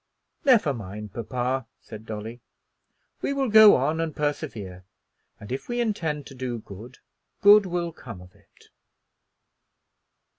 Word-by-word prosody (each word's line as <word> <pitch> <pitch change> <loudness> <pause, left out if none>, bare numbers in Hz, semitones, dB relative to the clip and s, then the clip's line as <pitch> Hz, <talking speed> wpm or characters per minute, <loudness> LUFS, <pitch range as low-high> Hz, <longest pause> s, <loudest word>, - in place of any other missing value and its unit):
"Never 220 - +4
mind, 105 -2 -8
papa," 125 +2 -3
said 110 0 -12
Dolly, 110 +2 -7 0.8
"we - - -1
will 270 -2 -1
go 220 -1 +9
on 150 +5 0
and 160 -2 -3
persevere, 115 - -4 0.6
and 105 - -11
if 130 - -5
we 240 0 -2
intend 165 - -2
to - - -11
do 125 -2 -4
good, 110 +4 -12 0.5
good 205 -1 +7
will 175 -1 -2
come 115 - -11
of 90 0 -15
it." - - -25
130 Hz, 135 wpm, -25 LUFS, 110-170 Hz, 0.8 s, go